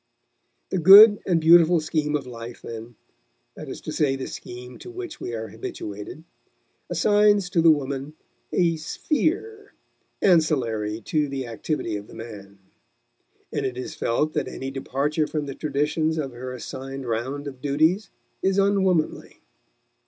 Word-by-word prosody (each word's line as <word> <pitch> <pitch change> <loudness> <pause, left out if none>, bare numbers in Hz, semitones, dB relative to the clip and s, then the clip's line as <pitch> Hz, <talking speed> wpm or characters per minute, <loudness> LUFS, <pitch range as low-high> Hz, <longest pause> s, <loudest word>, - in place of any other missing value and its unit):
The 190 - 0
good 205 +5 +10
and 175 -3 +3
beautiful 170 +1 +6
scheme 155 -1 -1
of 145 - -2
life, 120 -1 -9
then 115 +1 -8 0.6
that - - -9
is - - -7
to - - -6
say 140 -3 +1
the 135 - -5
scheme 125 +1 -9
to - - -10
which 365 0 -8
we 120 - -4
are 110 -1 -5
habituated 105 +5 -7 0.7
assigns 205 -3 +3
to 170 - +3
the 165 - +6
woman 140 0 0 0.4
a 170 -2 +2
"sphere" 335 - -2 0.4
ancillary 120 - +1
to 150 +6 0
the 135 -1 -4
activity 115 0 -3
of 100 0 -10
the - - -13
man; 100 -4 -10 1.0
and - - -1
it 125 -2 -3
is 125 - -5
felt 150 +7 0
that - - -1
any 135 0 -6
departure 140 +3 -1
from 150 -2 -3
the 140 - -5
traditions 150 +3 -1
of 140 -4 -3
her 125 +1 -7
assigned 135 +2 -7
round 125 +5 -3
of 130 -2 -9
duties 155 +8 +1 0.3
is 190 0 +1
unwomanly. 190 -5 +1
145 Hz, 150 wpm, -24 LUFS, 125-170 Hz, 1.0 s, good